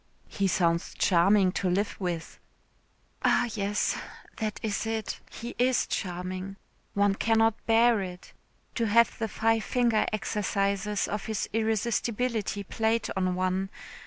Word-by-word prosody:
"He 200 -2 0
sounds 170 -2 +1
charming 190 +2 +4
to 185 0 -1
live 200 +4 0
with." 175 -3 -4 0.8
"Ah, 245 - +3
yes. 205 -1 0 0.4
That 215 -2 -3
is 220 0 -1
it. 225 -1 -3
He 235 - -7
is 255 0 +3
charming. 185 +1 -4 0.4
One 200 0 +3
cannot 225 +1 +2
bear 230 -1 +5
it. 180 -1 -8 0.4
To 230 - 0
have 230 +4 +4
the 225 - 0
five 225 +1 +1
finger 235 -3 +2
exercises 205 -1 -1
of 210 0 -3
his 220 -2 -2
irresistibility 225 -1 0
played 225 +3 0
on 185 -1 0
one. 185 +1 0
210 Hz, 130 wpm, -28 LUFS, 190-225 Hz, 0.8 s, bear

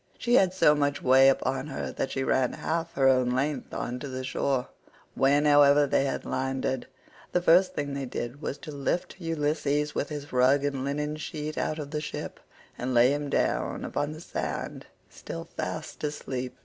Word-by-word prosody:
114 - - -31
She 240 - 0
had 185 -2 +3
so 185 -5 +5
much 145 -1 0
way 130 +1 +7
upon 135 +1 0
her 135 - -4
that - - -2
she 135 - -2
ran 130 -1 +1
half 165 0 -2
her 135 -1 +3
own 130 -2 +4
length 135 +2 -1
on 125 +1 -4
to 140 - -6
the 130 -1 -5
shore;115 130 0 -4
when, 145 +2 +3
however, 145 0 +6
they 135 0 +2
had 135 - -3
landed, 130 -1 -2 0.5
the 180 - +4
first 180 +2 +5
thing 145 -1 -2
they 140 -1 -3
did 120 +3 -5
was 140 - -3
to 155 - -9
lift 145 +6 -3
Ulysses 150 -2 0
with 145 - -2
his 145 -2 -7
rug 130 +3 +4
and 140 -2 -2
linen 150 +2 -2
sheet 155 0 -5
out 155 - -1
of 145 -2 -6
the 150 -1 -2
ship, 150 - -6 0.4
and 125 0 -2
lay 120 +3 +6
him 145 0 -3
down - - 0
upon 145 +1 -2
the 155 - -10
sand - - -4 0.2
still - - -7
fast - - -6
asleep. 130 -4 -4
140 Hz, 190 wpm, -27 LUFS, 130-150 Hz, 0.5 s, way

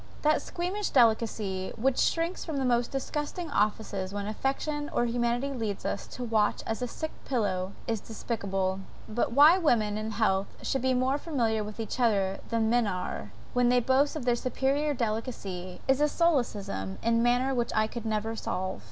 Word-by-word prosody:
That 305 0 +3
squeamish 370 +4 -3
delicacy 220 -6 +2
which 255 +3 +1
shrinks 335 +2 +1
from 315 -4 -4
the 270 - 0
most 240 -1 +2
disgusting 295 +4 -3
offices 205 -4 0
when 200 0 -3
affection 275 +7 -2
or 240 - +1
humanity 240 +3 0
lead 220 -6 -3
us 200 - -2
to 250 - -7
watch 220 -3 +1
at 225 +2 -3
a 250 - 0
sick 315 +6 -5
pillow, 195 -7 -1
is 225 -3 -1
despicable. 195 -4 -2 0.3
But, 230 +1 -1
why 305 +7 +8
women 215 - +2
in 215 +1 -3
health 200 -3 +1 0.2
should 270 - 0
be 260 0 +2
more 260 +3 +1
familiar 230 -10 0
with 210 +1 -8
each 225 +3 -4
other 200 -5 +2
than 230 -1 +1
men 235 -1 +3
are, 180 - -4 0.2
when 245 -1 +3
they 250 0 +5
boast 265 +5 +2
of 290 -5 -4
their 245 -1 +3
superiour 275 +4 0
delicacy, 215 -6 -3
is 265 +1 +3
a 300 - +5
solecism 215 - 0
in 230 0 +3
manners 250 +3 +2
which 240 -1 0
I 215 0 +4
could 225 +1 -6
never 220 +1 -1
solve. 185 -3 -3
235 Hz, 180 wpm, -29 LUFS, 210-270 Hz, 0.3 s, why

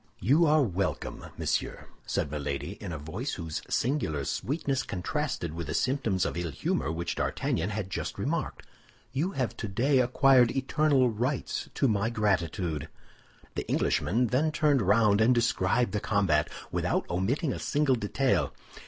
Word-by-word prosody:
"You 145 - +4
are 150 0 +5
welcome, 90 - -3
monsieur," - - -2 0.2
said 75 - -1
Milady, 70 +1 -3
in 100 -4 -5
a 80 - -4
voice 90 - -4
whose 80 -3 -4
singular 95 - 0
sweetness 135 - -1
contrasted 95 - -3
with 85 -2 -5
the 75 - -3
symptoms 115 - +1
of 70 - -2
ill 85 -1 -2
humor 70 0 -1
which 85 +1 -2
D'Artagnan 85 +4 -1
had 100 -2 -4
just - - -4
remarked; - - -2 0.5
"you 170 +8 -1
have 130 -6 -2
today 125 +7 +1
acquired 125 0 +4
eternal 135 -2 +2
rights 125 +6 -2
to 135 - +2
my 110 -1 +1
gratitude." 90 -8 -1 0.6
The - - -5
Englishman 120 +7 +1
then 140 +6 +1
turned 150 -4 +2
round 105 +1 +4
and 120 +3 +5
described 120 0 +2
the 105 - -1
combat 95 -8 +1 0.2
without - - 0
omitting 125 - 0
a - - -5
single 145 -2 +1
detail. 105 - +1
110 Hz, 150 wpm, -28 LUFS, 85-135 Hz, 0.6 s, are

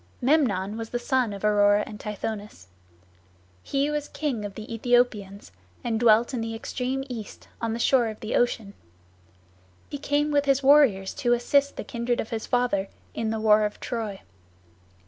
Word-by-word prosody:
Memnon 225 -8 +1
was 225 -1 -5
the 240 - -2
son 250 -2 0
of 200 +1 -5
Aurora 205 0 +4
and 210 - -9
Tithonus. 210 - -6 0.9
He 280 - -1
was 295 -1 -2
king 270 -8 -3
of 200 -1 -6
the 215 - -7
Aethiopians, 225 -4 0 0.3
and 225 -2 -1
dwelt 235 +2 +4
in 245 - -2
the 225 0 -4
extreme 255 +3 -3
east, 230 -6 -8
on 230 -1 -1
the - - -2
shore 240 0 +3
of 215 -1 -6
Ocean. 220 -2 0 1.2
He 285 - -4
came 290 +1 0
with 290 -1 +2
his 275 0 +2
warriors 265 -10 +5
to 240 - +3
assist 280 +4 +2
the - - -5
kindred 235 0 -2
of 220 - -4
his 225 -1 -4
father 245 -6 +1 0.2
in 225 -1 -2
the 220 0 -2
war 215 0 +5
of 210 0 -3
Troy. 220 -5 -4
230 Hz, 165 wpm, -26 LUFS, 210-255 Hz, 1.2 s, warriors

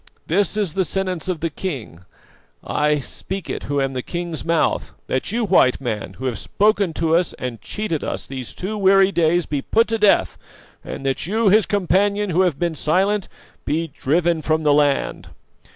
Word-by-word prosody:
This 200 +4 +1
is 200 -7 -1
the 190 +1 +1
sentence 185 0 -3
of 175 -4 -2
the 165 -1 -1
king, 130 - -6 0.6
I 150 0 +1
speak 190 +7 -6
it - - -5
who 145 0 +1
am 135 -1 0
the 130 - -2
king's 170 +2 -5
mouth: 165 -1 0
That 130 +8 -2
you, 230 +1 0
White 175 -10 +4
Man, 115 -5 -4
who 130 - -8
have 120 -5 -2
spoken 205 -3 +1
to 165 +1 +1
us 175 0 +1
and 120 -4 -6
cheated 170 - -3
us - - -4
these 130 -3 -7
two 210 +3 -4
weary 195 0 +5
days, 170 -1 +2
be 145 -2 -2
put 225 +9 +2
to 225 0 0
death, 210 -1 +3 0.4
and 135 - -7
that 135 +3 -1
you, 220 +2 +2
his 210 +2 +4
companion 200 +1 +1
who 175 +3 +3
have 180 -7 +1
been 170 -1 -1
silent, 190 +7 +1 0.4
be 160 +3 -1
driven 165 +4 0
from 155 +1 0
the 150 -1 +4
land. 145 -1 +1
170 Hz, 185 wpm, -21 LUFS, 145-195 Hz, 0.6 s, weary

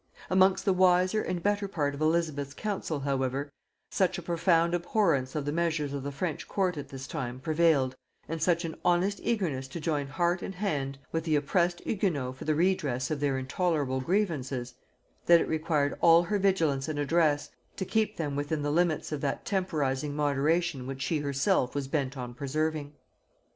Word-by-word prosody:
Amongst 190 0 +4
the 195 - +4
wiser 185 +3 +4
and 175 -2 -3
better 205 0 +1
part 145 -7 -1
of 140 - -7
Elizabeth's 155 -4 0
council 190 -8 -3
however, 135 +1 -1 0.4
such 185 -1 +1
a 175 - -6
profound 170 0 +2
abhorrence 170 - +1
of 150 -2 -2
the 145 - -1
measures 155 -3 0
of 140 - -3
the 140 +2 -4
French 155 +2 -3
court 185 -3 0
at 145 -2 -7
this 135 -1 -7
time 125 -1 -4
prevailed, 155 -3 +2 0.3
and 165 0 -4
such 170 +1 +2
an 160 - -4
honest 180 +3 +2
eagerness 165 - -1
to 135 - -7
join 150 -3 -1
heart 175 +5 0
and 195 - -5
hand 145 -9 -2
with 165 -1 -1
the 160 -2 +1
oppressed 175 +4 +1
Hugonots 150 - -1
for - - -9
the 155 -1 +1
redress 150 -7 0
of 150 - -1
their 140 -2 +1
intolerable 135 -1 0
grievances, 135 -8 -1 0.5
that 170 -1 +8
it - - -1
required 155 -2 0
all 165 0 +7
her 205 +3 -1
vigilance 165 -8 +1
and 155 -2 -3
address 145 0 +1 0.2
to 190 - -3
keep 220 +2 0
them 145 -4 -2
within 145 +1 -2
the 145 - 0
limits 165 -1 +1
of 150 -2 -3
that 140 -2 -2
temporizing 150 -7 -1
moderation 145 0 +1
which 135 0 -4
she 150 +4 0
herself 140 0 +1
was 140 -2 -2
bent 135 -1 -2
on 125 -1 -5
preserving. 150 +2 -2
155 Hz, 180 wpm, -29 LUFS, 140-175 Hz, 0.5 s, that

